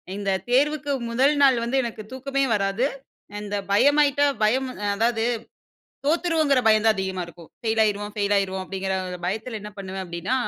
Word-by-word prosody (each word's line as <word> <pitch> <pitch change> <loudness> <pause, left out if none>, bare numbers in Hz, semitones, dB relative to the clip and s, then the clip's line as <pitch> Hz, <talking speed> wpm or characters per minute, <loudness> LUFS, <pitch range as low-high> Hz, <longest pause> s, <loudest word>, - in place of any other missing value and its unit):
இந்த 200 -1 -2 0.2
தேர்வுக்கு 290 +3 +2 0.2
முதல் 270 +5 +3
நாள் 265 -3 +6
வந்து 250 +3 0
எனக்கு 225 -2 -5
தூக்கமே 275 +1 -1
வராது! 195 +5 0 0.6
இந்த 205 0 -4 0.2
பயமாகிட்டா 285 +5 +4 0.2
பயம் 260 +5 +2 0.3
அதாவது 225 +1 +1 0.8
தோத்துருவோங்கிற 315 -4 +2
பயம் 215 0 +4
தான் 220 -2 +4
அதிகமா 190 -1 -2
இருக்கும். 170 -1 -14
ஃபெயில் 225 -1 0
ஆயிடுவோம் 205 0 -2
ஃபெயில் 205 -1 +1
ஆயிடுவோம் 190 -1 -1
அப்படிங்கிற 190 0 -3 0.3
பயத்தில 220 +4 -3
என்ன 210 0 -8
பண்ணுவேன் 190 -1 -5
அப்படின்னா. 175 +7 -3
220 Hz, 150 wpm, -24 LUFS, 195-270 Hz, 0.8 s, நாள்